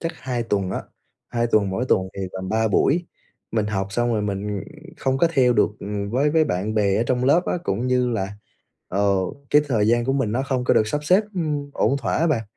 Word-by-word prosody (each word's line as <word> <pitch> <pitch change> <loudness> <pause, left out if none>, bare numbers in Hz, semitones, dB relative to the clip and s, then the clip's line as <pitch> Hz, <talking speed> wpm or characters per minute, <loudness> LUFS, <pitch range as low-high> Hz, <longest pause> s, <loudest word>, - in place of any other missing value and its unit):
chắc 165 0 -3
2 125 -2 -2
tuần 100 -4 -1
á, - - -3 0.5
2 120 -1 0
tuần, 105 -4 +2
mỗi 95 +7 -1
tuần 95 0 +2
thì - - -4
tầm 95 0 -5
3 110 0 +1
buổi. 165 - +2 0.4
Mình 110 -2 0
học 95 -2 -1
xong 120 +2 +1
rồi 105 - 0
mình 100 0 -3 0.3
không 135 0 0
có 170 - +4
theo 125 -5 +4
được, 105 - +3
ừm, 100 0 -4
với 140 +6 +2
với 160 0 +3
bạn 105 -4 -2
bè 100 -2 +2
ở 110 - +2
trong 125 0 0
lớp 165 +7 +4
á, - - 0
cũng 115 +6 -1
như 125 -1 +2
là, 100 -4 -2 0.6
ờ, 100 +1 +2 0.3
cái 150 0 +5
thời 110 -5 +2
gian 120 +1 +3
của 135 - 0
mình 135 -6 0
nó 130 +3 0
không 130 -2 -1
có - - +3
được 110 - +3
sắp 150 +6 -2
xếp, 185 +6 +4
ưm, 150 -5 -2
ổn 140 - +1
thỏa 120 - -1
á 165 - +2
bạn, 140 -9 +1
120 Hz, 240 wpm, -23 LUFS, 105-135 Hz, 0.6 s, cái